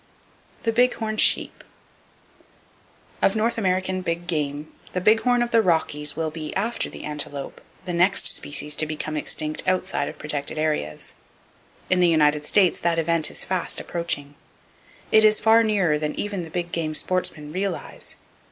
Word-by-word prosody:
The 230 - +1
Big 245 +2 +3
Horn 215 -1 -3
Sheep. - - +2 1.6
—Of 195 - +3
North 230 +2 0
American 185 -1 0
big 170 -1 -3
game, 150 -3 -3 0.2
the 180 - 0
big 215 +4 +4
horn 245 +1 +2
of 240 - -4
the 230 - +5
Rockies 150 -5 0
will 160 0 -2
be, 155 -1 -6
after 225 +5 -1
the - - -10
antelope, 145 -2 -4 0.2
the 180 - -3
next 180 +3 +3
species 150 +1 +2
to 155 - +3
become 155 0 -4
extinct 155 0 -2
outside 185 0 0
of - - -10
protected 150 0 -4
areas. 155 - -2 0.8
In 185 - +4
the 180 - +5
United 150 -2 +3
States 185 +2 +3
that 170 -1 0
event 165 -1 +2
is - - -3
fast 185 -2 -2
approaching. 155 -5 -3 0.8
It 220 - +6
is 215 0 +5
far 225 +1 +5
nearer 195 -9 +1
than 150 0 -3
even 205 -3 -3
the 165 - -8
big 175 +1 -4
game 155 -2 -2
sportsmen 155 -4 -1
realize. 190 0 -4
170 Hz, 160 wpm, -23 LUFS, 150-195 Hz, 1.6 s, It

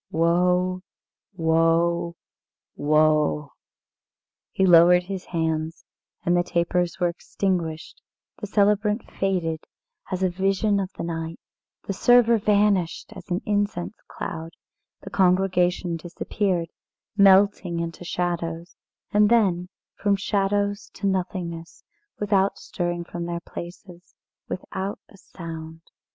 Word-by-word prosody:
Woe! 180 +2 +2 0.5
woe! 165 +1 +2 0.6
woe!" 150 -1 +2 1.0
He 190 - +2
lowered 175 0 +7
his 190 0 -6
hands, 160 -1 -2 0.4
and 175 - +3
the 175 - +4
tapers 175 +1 0
were 175 - +3
extinguished, 170 -2 -3 0.4
the 210 - -5
celebrant 210 +2 +2
faded 175 -5 -1 0.5
as 185 0 -1
a 185 - +3
vision 195 +3 +1
of 190 -1 -3
the - - -6
night, 165 -1 -4 0.5
the 195 - -2
server 235 +2 +5
vanished 200 -4 +1
as - - -11
an 180 +1 -1
incense 205 -2 -1
cloud, 165 +1 -6 0.5
the - - -9
congregation 180 -2 +2
disappeared, 175 +1 -2 0.5
melting 195 -3 +4
into 170 +1 -5
shadows, 170 -1 -3 0.4
and 210 0 +4
then 185 -6 +2 0.2
from 205 -1 +1
shadows 200 +1 0
to - - -5
nothingness, 180 -3 -3 0.4
without 200 -1 +2
stirring 175 -1 -3
from 170 0 -6
their 170 0 -3
places, 175 +1 -10
and - - -9
without 195 +1 -5
a 200 - -17
sound. 165 -3 -9
180 Hz, 110 wpm, -24 LUFS, 170-195 Hz, 1.0 s, lowered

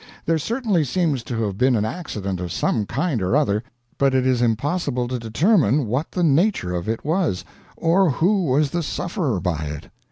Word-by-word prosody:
There 165 0 +2
certainly 220 - 0
seems 150 -2 0
to 115 -2 -2
have 100 -2 -3
been 130 0 +4
an 105 -1 +1
accident 105 - -4
of 90 -1 -4
some 105 -4 0
kind 140 - -1
or 95 +7 +1
other, 105 -9 +1 0.4
but 135 -1 +3
it 130 -1 +2
is 130 -2 +2
impossible 125 +2 0
to 125 0 -3
determine 140 - +2
what 125 +8 -2
the 180 - 0
nature 155 - +2
of 90 +3 -3
it 110 +4 -3
was, 160 - 0 0.3
or 175 +2 +3
who 180 +7 +2
was 140 +1 +2
the 175 - -1
sufferer 155 - -2
by 85 -5 -2
it. 75 0 -7
135 Hz, 190 wpm, -22 LUFS, 110-170 Hz, 0.4 s, been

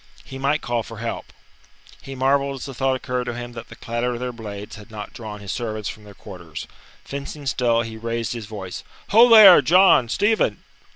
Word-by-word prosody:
He 135 - -9
might 140 +3 0
call 120 -1 -1
for 115 0 -10
help. 115 +1 -5 0.7
He 135 - -9
marvelled 140 +1 +1
as 135 - -7
the 135 - -7
thought 130 +1 0
occurred 125 -1 -3
to 120 -1 -4
him 120 0 -7
that 115 -1 -10
the 115 - -11
clatter 120 +1 -3
of - - -6
their 125 0 -4
blades 105 -3 -8
had 105 +1 -13
not 105 -2 -8
drawn 105 -3 -8
his 100 - -6
servants 110 -3 -4
from 105 -2 -10
their 100 -1 -14
quarters. - - -9 0.4
Fencing 140 +1 -7
still, 120 -3 +1
he 110 -1 -8
raised 115 0 -3
his 115 -3 -7
voice: 100 -4 -7 0.3
"Ho, 230 +4 +7
there! 215 -5 +10
John, 180 -9 +5
Stephen!" 215 - +1
120 Hz, 205 wpm, -22 LUFS, 110-135 Hz, 0.7 s, there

